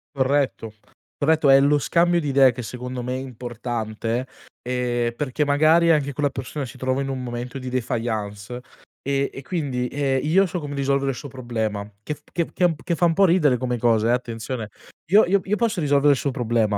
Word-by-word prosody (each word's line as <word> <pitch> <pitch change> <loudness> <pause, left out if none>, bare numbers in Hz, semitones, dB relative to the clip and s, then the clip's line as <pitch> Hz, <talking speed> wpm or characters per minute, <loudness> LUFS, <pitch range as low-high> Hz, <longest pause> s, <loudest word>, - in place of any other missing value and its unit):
Corretto, 130 -5 0 0.4
corretto, 155 -1 +3
è 135 - +8
lo 145 +1 +3
scambio 175 +3 +2
di 150 - -3
idee 135 -2 +5
che 125 +1 -7
secondo 125 +2 -6
me 125 +1 -3
è - - -2
importante, 120 -1 -4 0.3
ehm, 120 -1 -1
perché 145 +2 -1
magari 155 +4 +4
anche 145 -3 +2
quella 145 +1 0
persona 135 +2 -5
si 130 - -12
trova 130 +1 -1
in 135 - -3
un 130 -1 -4
momento 120 +1 -5
di 130 -1 -7
défaillance, 115 -2 -3 0.4
e 140 0 -1
e 135 - -7
quindi, 135 -6 -2
ehm, 135 0 0
io 175 +6 +4
so 180 0 -4
come 145 -2 -6
risolvere 140 0 0
il 130 - -3
suo 145 - -8
problema, 110 -5 -3
che 150 - -3
f - - -14
che 170 -2 0
che 175 -3 +2
che 170 - -1
fa 175 - +2
un 165 -1 +2
po' 195 +2 +5
ridere 160 -8 +3
come 125 -1 -2
cosa, 115 -1 +2
ehm, - - +4
attenzione 115 -1 -4 0.4
io 210 +2 +7
io 195 +2 +2
io 205 - 0
posso 215 -5 0
risolvere 145 -1 +4
il 135 - -2
suo 140 - -1
problema, 115 -5 0
130 Hz, 205 wpm, -23 LUFS, 120-145 Hz, 0.4 s, è